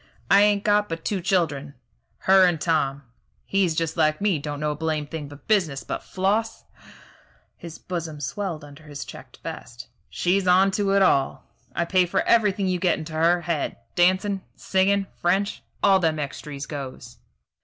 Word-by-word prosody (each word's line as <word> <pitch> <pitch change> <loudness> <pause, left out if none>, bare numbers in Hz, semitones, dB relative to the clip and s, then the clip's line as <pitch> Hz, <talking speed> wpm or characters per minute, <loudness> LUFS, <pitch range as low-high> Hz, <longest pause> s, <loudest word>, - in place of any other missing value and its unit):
"I 200 - +7
ain't 205 -1 +3
got 210 0 +2
but 165 0 -5
two 195 -3 -1
children, 155 -7 0 0.5
her 190 0 +6
and 170 -3 0
Tom. 140 -4 0 0.4
He's 190 -5 +1
just 165 -1 -1
like 155 -1 +2
me 200 -6 +1
don't 145 0 -5
know 150 0 0
a - - -3
blame 155 -1 -2
thing 150 -1 -6
but 145 0 -14
business; 175 -11 +1
but - - -4
Floss 205 +4 -1 0.5
" - - -27 0.3
his 170 -1 -10
bosom 165 -4 -5
swelled 160 - -4
under 145 +2 -14
his 145 -2 -7
checked - - -12
vest 120 +1 -8 0.2
"she's 185 +2 0
on 190 +2 +5
to 195 0 0
it 200 - +5
all. 135 -7 +2 0.3
I 170 - 0
pay 180 +1 +3
for - - +1
everything 210 -4 +3
you 180 -1 0
get 180 0 +2
into 160 0 -7
her 170 +2 +3
head. 165 -3 -2 0.2
Dancin', 190 +2 +2
singin', 195 +1 +1 0.2
French 190 +4 +1 0.2
all 195 -1 +6
them 160 -3 +1
extries 145 0 -5
goes." 130 -5 -8
170 Hz, 175 wpm, -24 LUFS, 150-195 Hz, 0.5 s, I